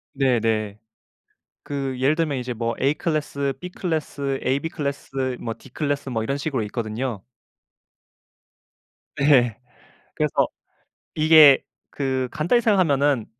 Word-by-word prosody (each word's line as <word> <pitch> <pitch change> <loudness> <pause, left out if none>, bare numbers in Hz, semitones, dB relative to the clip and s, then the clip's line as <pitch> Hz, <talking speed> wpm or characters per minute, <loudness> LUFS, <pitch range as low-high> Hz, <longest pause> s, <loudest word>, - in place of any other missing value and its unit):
네네. 115 -6 0 0.8
그 135 -3 -4
예를 135 +4 +3
들면 155 -4 0
이제 125 0 -3
뭐 115 0 -2
A클래스, 140 -1 -1
B클래스, 155 -6 -3
AB클래스, 135 -2 -2
뭐 115 - -4
D클래스 140 +1 -3
뭐 115 -3 -2
이런 135 +5 -2
식으로 140 -5 -2
있거든요. 110 0 -4 1.9
네. 130 -6 +4 0.6
그래서 - - -1 0.8
이게 155 -3 +7 0.3
그 130 -2 -2
간단히 170 - +2
생각하면은 145 - +2
135 Hz, 235 characters per minute, -23 LUFS, 125-150 Hz, 1.9 s, 이게